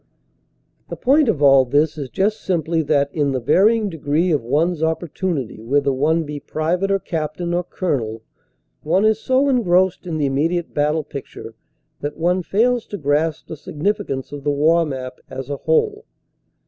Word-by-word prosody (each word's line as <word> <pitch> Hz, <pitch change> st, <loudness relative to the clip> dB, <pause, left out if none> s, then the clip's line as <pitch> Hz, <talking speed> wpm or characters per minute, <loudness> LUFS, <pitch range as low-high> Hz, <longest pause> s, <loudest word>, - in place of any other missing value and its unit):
The -, -, -4 dB
point 275 Hz, +1 st, +3 dB
of 150 Hz, -9 st, 0 dB
all 135 Hz, -1 st, +7 dB
this 145 Hz, +4 st, +1 dB
is 140 Hz, -4 st, -6 dB
just 210 Hz, -, 0 dB
simply 165 Hz, -2 st, 0 dB
that, 140 Hz, -2 st, +1 dB
in 145 Hz, -3 st, 0 dB
the 130 Hz, -, 0 dB
varying 210 Hz, -, +3 dB
degree 160 Hz, 0 st, 0 dB
of 145 Hz, -6 st, +1 dB
one 150 Hz, +9 st, +1 dB
s 170 Hz, -3 st, -6 dB
opportunity 160 Hz, -, -2 dB
whether 140 Hz, +4 st, +1 dB
one 155 Hz, +5 st, +1 dB
be 150 Hz, -1 st, -6 dB
private 170 Hz, +7 st, -1 dB
or 195 Hz, -, +3 dB
cap 155 Hz, -5 st, -4 dB
tain 175 Hz, -1 st, -3 dB
or 175 Hz, +1 st, 0 dB
colonel 115 Hz, -, -3 dB, 0.6 s
one 195 Hz, +3 st, +2 dB
is 220 Hz, 0 st, +3 dB
so 260 Hz, +4 st, +2 dB
engrossed 190 Hz, -9 st, +2 dB
in 160 Hz, -2 st, -2 dB
the 150 Hz, -, 0 dB
immediate 160 Hz, +6 st, -1 dB
battle 150 Hz, +2 st, +1 dB
picture 135 Hz, -5 st, -9 dB, 0.5 s
that 145 Hz, +1 st, -5 dB
one 180 Hz, +3 st, +1 dB
fails 235 Hz, +6 st, +1 dB
to 205 Hz, -, -5 dB
grasp 150 Hz, +1 st, 0 dB
the -, -, -6 dB
significance 155 Hz, -, -3 dB
of 145 Hz, -1 st, -7 dB
the 145 Hz, -, 0 dB
war 160 Hz, +3 st, +3 dB
map 130 Hz, -2 st, -6 dB
as 135 Hz, +1 st, -6 dB
a 140 Hz, -, -2 dB
whole. 445 Hz, -, 0 dB
160 Hz, 175 wpm, -20 LUFS, 145-185 Hz, 0.6 s, all